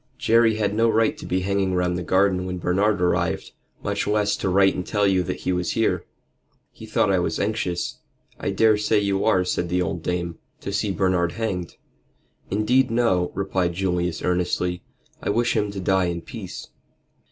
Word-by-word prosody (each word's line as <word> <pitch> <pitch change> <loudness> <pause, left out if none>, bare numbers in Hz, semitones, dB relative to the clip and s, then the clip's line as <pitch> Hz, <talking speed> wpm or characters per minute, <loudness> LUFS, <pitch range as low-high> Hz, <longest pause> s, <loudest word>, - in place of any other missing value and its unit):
Jerry 115 -1 +4
had 105 -2 0
no 115 +2 +3
right 110 0 +2
to - - -8
be 95 +1 0
hanging 95 0 0
round 90 0 +1
the 90 - -2
garden 95 +1 +2
when 90 0 -3
Bernard 100 +4 +1
arrived, 90 0 0 0.3
much - - -1
less 105 0 +2
to - - -1
write 95 +1 +4
and 90 - -3
tell 105 +2 0
you 95 -2 +3
that 90 - -4
he 90 - 0
was 90 -2 -1
here." - - 0 0.7
"He 110 - -12
thought 105 -2 +2
I 95 - +3
was 90 - -1
anxious." 100 -4 -2 0.4
"I - - -2
daresay 105 -1 +3
you 100 -1 0
are," 90 -1 +3
said 90 -1 -1
the 90 +1 +1
old 85 -1 -3
dame, 85 0 -3 0.2
"to 100 - -5
see 100 0 0
Bernard 90 -2 +1
hanged." 95 -6 -3 0.7
"Indeed, 120 +6 +2
no," 115 -7 +1
replied 95 -3 0
Julius, 90 -2 -1
earnestly. 90 0 0 0.4
"I - - -3
wish 120 +3 +1
him 105 -2 +1
to 100 -1 -5
die 95 0 +2
in 85 -1 -2
peace." - - -8
95 Hz, 185 wpm, -23 LUFS, 90-105 Hz, 0.7 s, Jerry